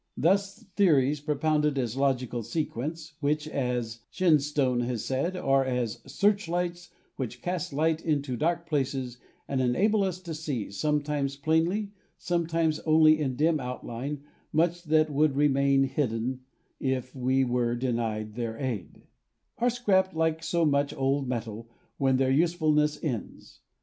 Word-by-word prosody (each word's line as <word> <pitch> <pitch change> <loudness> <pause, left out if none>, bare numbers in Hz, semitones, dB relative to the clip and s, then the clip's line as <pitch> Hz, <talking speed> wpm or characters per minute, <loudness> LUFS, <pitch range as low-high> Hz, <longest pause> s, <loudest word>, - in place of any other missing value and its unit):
Thus 195 +4 +1
theories, 150 -7 +3
propounded 150 0 +1
as 120 -3 -1
a - - -4
logical 125 -3 0
sequence, 155 +5 -4
which, 150 +1 0
as 125 -5 -2
Shen 170 -5 +3
stone 140 -3 0
has 120 -2 -2
said, 155 +8 -1
are 135 -5 +2
as 125 -3 -2
"searchlights 175 +1 0 0.3
which 125 -2 -5
cast 180 -3 -2
light 160 +3 0
into 145 -5 0
dark 170 +6 0
places 135 -4 -2 0.3
and 135 -1 0
enable 200 - +2
us 185 -2 -2
to 170 -3 -6
see, 145 -10 -4
sometimes 145 +3 -1
plainly, 165 +8 +1 0.3
some 170 -2 -1
times 165 -2 +1
only 155 0 +5
in 135 -4 -1
dim 155 +3 +2
outline, 125 +2 -5 0.3
much 170 +2 +1
that 155 0 +3
would 145 0 +2
remain 140 -1 +3
hidden 130 -2 -1 0.4
if 130 -1 -2
we 130 +1 +2
were 120 -1 0
denied 115 -4 -2
their 115 -1 -4
aid," 115 -9 -5 0.6
are 245 - +3
scrapped 190 -7 +1
like 160 0 +1
so 165 +1 +1
much 140 -1 +1
old 135 0 0
metal 115 -2 -4 0.3
when 135 -1 +2
their 130 0 +2
usefulness 155 -1 +2
ends. 125 -9 -5
145 Hz, 145 wpm, -28 LUFS, 125-160 Hz, 0.6 s, only